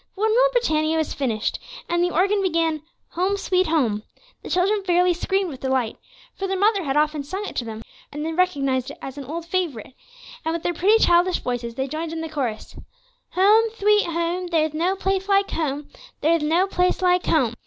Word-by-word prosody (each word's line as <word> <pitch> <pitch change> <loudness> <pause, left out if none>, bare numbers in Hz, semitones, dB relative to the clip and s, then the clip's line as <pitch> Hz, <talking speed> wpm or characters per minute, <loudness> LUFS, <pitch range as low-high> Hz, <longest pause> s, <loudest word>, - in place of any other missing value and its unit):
But 405 - -4
when 440 - +3
"Rule - - +4
Britannia" 315 -10 +1
was 315 - -1
finished, 230 -6 -2 0.3
and 345 0 +1
the 355 - +2
organ 390 +4 +2
began 330 -4 0 0.3
"Home, 375 +4 0
sweet 370 -1 +1
Home," 250 -10 +1 0.4
the - - -9
children 395 +3 +1
fairly 360 -1 +3
screamed 380 +1 -1
with 265 - -9
delight; 260 -4 -1 0.4
for 390 - -4
their 385 0 -1
mother 405 0 +2
had 275 +1 0
often 300 -1 +1
sung 380 +8 -5
it - - -7
to 240 - -1
them, 220 0 -7 0.3
and 295 +1 -5
they 325 - -2
recognized 275 -7 0
it 285 - -9
as 270 +1 -8
an 275 - -7
old 325 +5 -5
favorite; 335 - -3 0.5
and 325 +1 -1
with 335 - -5
their 350 - 0
pretty, 400 +7 +4
childish 350 +1 +3
voices, 235 -2 -3
they 265 +1 -2
joined 315 +3 -4
in 325 - -4
the 325 - -5
chorus: 250 -8 -4 0.6
"Home, 420 +5 +5
sweet 420 -1 +3
home, 340 +2 -2
there's 315 -3 +1
no 345 +5 0
place 385 0 -1
like 395 0 +3
home, 295 -2 -2 0.3
there's 325 +2 +3
no 325 +5 +2
place 365 -1 0
like 360 0 +2
home." 255 -8 +2
335 Hz, 205 wpm, -23 LUFS, 290-375 Hz, 0.6 s, Home